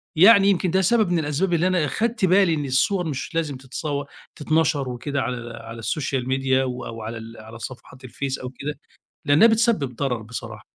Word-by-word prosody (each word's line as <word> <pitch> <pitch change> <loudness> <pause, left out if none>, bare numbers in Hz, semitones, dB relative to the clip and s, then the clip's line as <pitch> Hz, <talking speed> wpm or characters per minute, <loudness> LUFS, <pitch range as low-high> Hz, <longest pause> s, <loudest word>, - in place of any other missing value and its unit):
يعني 195 +3 +7
يمكن 185 -2 +1
ده 190 +1 +3
سبب 215 0 +3
من 175 - +2
الأسباب 155 +4 -1
اللي 170 +2 +2
أنا 180 -4 +2
اخدت 225 - 0
بالي 185 -2 +4
إن 145 -2 -2
الصور 175 +8 +1
مش 145 +2 -5
لازم 155 -5 -1
تتصوّر 140 +2 -4 0.3
تتَنشَر 150 -3 +1
وكده 140 +3 -3
على 120 -2 -4
على 115 0 -9
السوشيال 130 +2 -2
ميديا 130 0 +1
و 125 -1 -4
أو 115 -1 -7 0.4
على 110 +2 -11
صفحات 130 +2 -10
الفيس 135 +2 -4
أو 125 - -6
كده 140 +2 -6 0.5
لأنها 145 +10 +6
بتسبب 220 - +1
ضرر 125 -5 -1
بصراحة. 110 -1 -8
140 Hz, 180 wpm, -23 LUFS, 125-175 Hz, 0.5 s, يعني